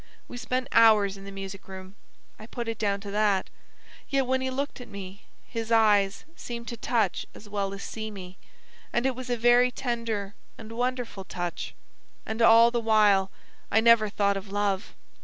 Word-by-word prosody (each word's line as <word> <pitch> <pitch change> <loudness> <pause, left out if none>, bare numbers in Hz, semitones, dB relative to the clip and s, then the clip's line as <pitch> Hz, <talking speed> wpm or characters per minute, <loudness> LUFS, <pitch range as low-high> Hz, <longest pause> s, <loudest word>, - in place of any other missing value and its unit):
We - - -9
spent 255 +1 -2
hours 215 -3 +5
in 195 0 -11
the 200 - -8
music 195 0 -8
room. 190 0 -9 0.5
I 215 - -10
put 235 -1 -5
it 225 -1 -3
down 200 -2 0
to 200 -1 -7
that; 205 -2 +1 0.6
yet 275 -1 +1
when 260 +1 0
he 260 - -1
looked 275 0 -4
at 245 - -10
me 200 -1 -9 0.2
his 230 -1 -5
eyes 210 -3 +3
seemed 235 -1 -7
to 235 - -5
touch 220 -4 0
as 210 - -12
well 200 -1 -2
as 195 0 -7
see 220 -1 -5
me, 190 -3 -10 0.5
and 240 - 0
it 265 - +2
was 255 0 -7
a 245 - 0
very 240 +2 +5
tender 230 -5 -3 0.2
and 220 0 -10
wonderful 245 -4 -3
touch. 175 -2 -5 0.5
And 220 +1 -4
all 230 +1 +7
the 240 - 0
while 210 -4 +4 0.4
I 220 - +4
never 225 -2 +5
thought 200 -1 +1
of 195 0 -8
love. 205 -1 -1
220 Hz, 185 wpm, -27 LUFS, 200-235 Hz, 0.6 s, all